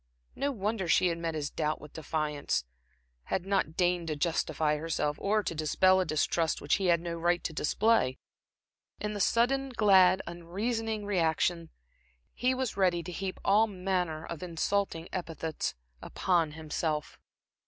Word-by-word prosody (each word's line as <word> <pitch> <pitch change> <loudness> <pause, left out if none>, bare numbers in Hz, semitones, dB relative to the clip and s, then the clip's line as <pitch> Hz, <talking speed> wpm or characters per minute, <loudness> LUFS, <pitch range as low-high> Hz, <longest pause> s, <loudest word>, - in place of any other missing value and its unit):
No 285 +1 0
wonder 210 -4 -2
she 180 +2 +4
had 170 0 -3
met 165 -1 -2
his 145 -2 -3
doubt 155 -1 -1
with 150 - -12
defiance, 150 - -2 0.6
had 185 - -2
not 195 -5 0
deigned 175 -2 +1
to 155 - -1
justify 155 -1 0
herself, 150 -1 -1
or 210 +1 +1
to 170 - -2
dispel 185 +4 +3
a 185 - +1
distrust 160 +1 0
which 145 - +1
he 195 -2 0
had 170 -1 +4
no 170 0 -4
right 175 +1 +1
to 165 - -3
display. 150 - +2 0.8
In 210 0 -3
the 205 - -4
sudden, 270 +6 +2
glad, 190 -6 +5
unreasoning 210 +6 -3
reaction, 170 -3 +1 0.6
he 255 +2 +1
was 255 -2 -2
ready 180 -3 +2
to 180 - -7
heap 190 +1 -4
all 215 +3 +5
manner 180 -5 -2
of 170 - -7
insulting 175 0 -1
epithets 165 - -3 0.3
upon 170 -5 0
himself. 155 -1 -3
175 Hz, 155 wpm, -30 LUFS, 160-200 Hz, 0.8 s, glad